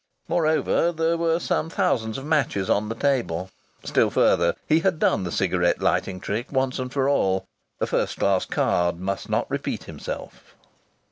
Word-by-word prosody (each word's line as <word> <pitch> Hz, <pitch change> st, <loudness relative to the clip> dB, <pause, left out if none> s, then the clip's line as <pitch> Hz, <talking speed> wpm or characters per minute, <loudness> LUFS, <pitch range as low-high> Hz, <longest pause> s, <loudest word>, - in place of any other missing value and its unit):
Moreover, 160 Hz, +1 st, +2 dB
there 165 Hz, 0 st, +1 dB
were 165 Hz, 0 st, +1 dB
some 160 Hz, -1 st, -1 dB
thousands 120 Hz, -, 0 dB
of 135 Hz, -, -7 dB
matches 135 Hz, -, +1 dB
on 105 Hz, +1 st, +1 dB
the 115 Hz, -, -3 dB
table. 95 Hz, -10 st, -1 dB, 0.3 s
Still -, -, +2 dB
further, 85 Hz, -1 st, +3 dB
he 160 Hz, +1 st, +4 dB
had 180 Hz, -1 st, +1 dB
done 125 Hz, -, +2 dB
the 90 Hz, -, -4 dB
cigarette 90 Hz, -1 st, +1 dB
lighting 95 Hz, -1 st, 0 dB
trick 110 Hz, +7 st, -4 dB
once 130 Hz, -1 st, 0 dB
for 135 Hz, +1 st, 0 dB
all. 95 Hz, -9 st, +1 dB, 0.3 s
A -, -, +1 dB
first -, -, -1 dB
class 95 Hz, -2 st, +2 dB
card 85 Hz, -1 st, +1 dB
must 95 Hz, +1 st, -3 dB
not -, -, +1 dB
repeat -, -, -3 dB
himself. -, -, -8 dB
120 Hz, 160 wpm, -24 LUFS, 95-155 Hz, 0.3 s, he